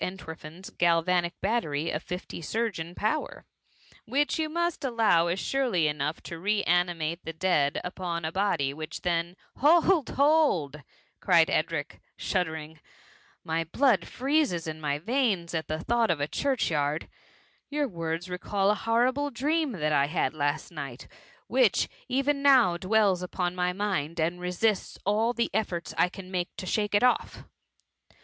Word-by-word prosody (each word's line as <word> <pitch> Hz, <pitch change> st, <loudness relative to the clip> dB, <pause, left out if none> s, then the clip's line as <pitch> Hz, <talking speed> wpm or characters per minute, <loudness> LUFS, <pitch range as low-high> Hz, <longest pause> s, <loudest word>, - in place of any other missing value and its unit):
38 185 Hz, +1 st, -3 dB
Eotwerfen's 160 Hz, +1 st, -9 dB
galvanic 175 Hz, +1 st, +1 dB
butt^y 160 Hz, -10 st, 0 dB
of 150 Hz, -, -2 dB
fifty 180 Hz, -1 st, -6 dB
surgeon 180 Hz, -3 st, -3 dB
pow^, 220 Hz, +9 st, -2 dB, 0.6 s
(which 290 Hz, +2 st, +1 dB
you 310 Hz, -1 st, 0 dB
niuat 345 Hz, 0 st, -1 dB
allow 225 Hz, -10 st, +3 dB
is 175 Hz, +3 st, -1 dB
surely 240 Hz, -, +1 dB
enough 150 Hz, +1 st, -2 dB
to 170 Hz, -, -7 dB
ro^animaie 175 Hz, -4 st, +1 dB
the 165 Hz, -, -4 dB
dead,) 160 Hz, -4 st, +1 dB
upon 180 Hz, -2 st, -4 dB
9k 160 Hz, +1 st, -3 dB
body 170 Hz, -9 st, +1 dB
which 155 Hz, +1 st, -7 dB
then 170 Hz, 0 st, -1 dB
'* -, -, -33 dB
^' -, -, -18 dB
Hold 330 Hz, +2 st, +4 dB
1 -, -, -7 dB
bold 280 Hz, -, +3 dB
P 150 Hz, -, -10 dB, 0.5 s
eried -, -, +5 dB
Edric, -, -, -1 dB, 0.2 s
shuddering* 160 Hz, -4 st, -2 dB
^* -, -, -22 dB, 0.7 s
My 165 Hz, -1 st, -1 dB
hlood 215 Hz, -, +2 dB
freezes 270 Hz, -, 0 dB
in 155 Hz, 0 st, -6 dB
my 145 Hz, -1 st, 0 dB
veins, 200 Hz, -, 0 dB
at 160 Hz, -1 st, -2 dB
the 155 Hz, -, -2 dB
thought 235 Hz, +5 st, +1 dB
<^ 165 Hz, -, +1 dB
a 145 Hz, -, 0 dB
church 265 Hz, -, 0 dB
yard: 150 Hz, 0 st, -1 dB, 0.6 s
^your 290 Hz, 0 st, 0 dB
words 165 Hz, -3 st, -4 dB
recall 195 Hz, +2 st, 0 dB
a -, -, +3 dB
horrible 245 Hz, +6 st, +1 dB
dream 290 Hz, +2 st, 0 dB
that 155 Hz, -5 st, -1 dB
I 140 Hz, -1 st, +3 dB
had 150 Hz, -3 st, 0 dB
last 145 Hz, +1 st, -2 dB
night, 140 Hz, -6 st, -7 dB, 0.4 s
which^ -, -, +3 dB, 0.2 s
even 275 Hz, +2 st, +1 dB
now^ 255 Hz, -11 st, +5 dB
dwells 195 Hz, -1 st, +2 dB
upon 180 Hz, 0 st, -2 dB
aiy 180 Hz, 0 st, 0 dB
mind, 185 Hz, -6 st, -2 dB
and 170 Hz, +3 st, 0 dB
resists 185 Hz, +4 st, 0 dB
all 220 Hz, +4 st, +2 dB
the 235 Hz, 0 st, -1 dB
efibrts 190 Hz, -5 st, -2 dB
I 180 Hz, -, +3 dB
can 190 Hz, 0 st, -10 dB
make 180 Hz, -2 st, -1 dB
to -, -, -5 dB
shake 210 Hz, +1 st, 0 dB
it 205 Hz, -, +3 dB
off.' 250 Hz, -, +1 dB
180 Hz, 165 wpm, -28 LUFS, 160-235 Hz, 0.7 s, eried